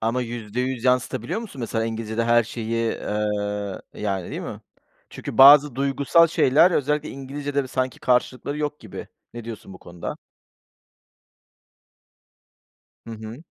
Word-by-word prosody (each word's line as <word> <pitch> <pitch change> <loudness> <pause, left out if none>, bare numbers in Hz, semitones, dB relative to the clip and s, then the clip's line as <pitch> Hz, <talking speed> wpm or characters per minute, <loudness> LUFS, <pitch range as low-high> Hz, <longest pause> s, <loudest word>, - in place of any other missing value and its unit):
Ama 115 +3 0
%100 120 +2 -4
yansıtabiliyor 125 - 0
musun, 185 - -9
mesela, 115 -1 -1
İngilizce'de 115 0 -2
her 120 0 +4
şeyi, 115 0 -2
eee, 105 -1 -3
yani, 95 -4 -3
değil - - -4
mi? - - -7 0.5
Çünkü - - -7
bazı 140 0 +9
duygusal 140 +5 +3
şeyler, 160 +2 +4
özellikle 150 -1 0
İngilizce'de 140 +1 -3
bö - - -7
sanki 130 -1 -2
karşılıkları 125 +3 0
yok 150 0 -3
gibi. 110 - -9 0.3
Ne 120 - -7
diyorsun 110 -4 -8
bu 90 - -12
konuda? 85 0 -7 2.9
Hı - - -8
hı. 110 +7 -9
120 Hz, 130 wpm, -23 LUFS, 110-140 Hz, 2.9 s, bazı